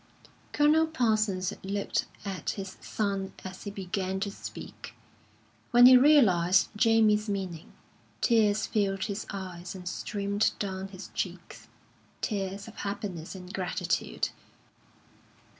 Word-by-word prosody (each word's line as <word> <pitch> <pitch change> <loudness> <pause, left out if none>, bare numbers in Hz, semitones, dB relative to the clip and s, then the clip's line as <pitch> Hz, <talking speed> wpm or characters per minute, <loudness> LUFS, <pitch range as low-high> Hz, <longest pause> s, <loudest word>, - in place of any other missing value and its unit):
Colonel 305 +2 +4
Parsons 215 - +1
looked 200 +1 -1 0.2
at 190 -5 -4
his 195 -1 -6
son 195 -2 -2
as 185 0 -8
he - - -3
began 190 -1 -3
to 200 0 -1
speak. - - -9 0.7
When 245 0 +7
he 255 0 +10
realised 190 - +5
Jamie's 215 -1 +4
meaning, 185 -5 -4 0.5
tears 215 -3 +3
filled 195 -2 0
his 205 0 -4
eyes 185 -2 -6
and 180 -1 -8
streamed 200 +3 -1
down 190 -1 -3
his 195 0 -10
cheeks - - -5 0.5
tears 200 -1 -3
of 225 - -12
happiness 195 -4 -5
and 185 0 -9
gratitude. 180 - -1
200 Hz, 115 wpm, -29 LUFS, 190-215 Hz, 0.7 s, he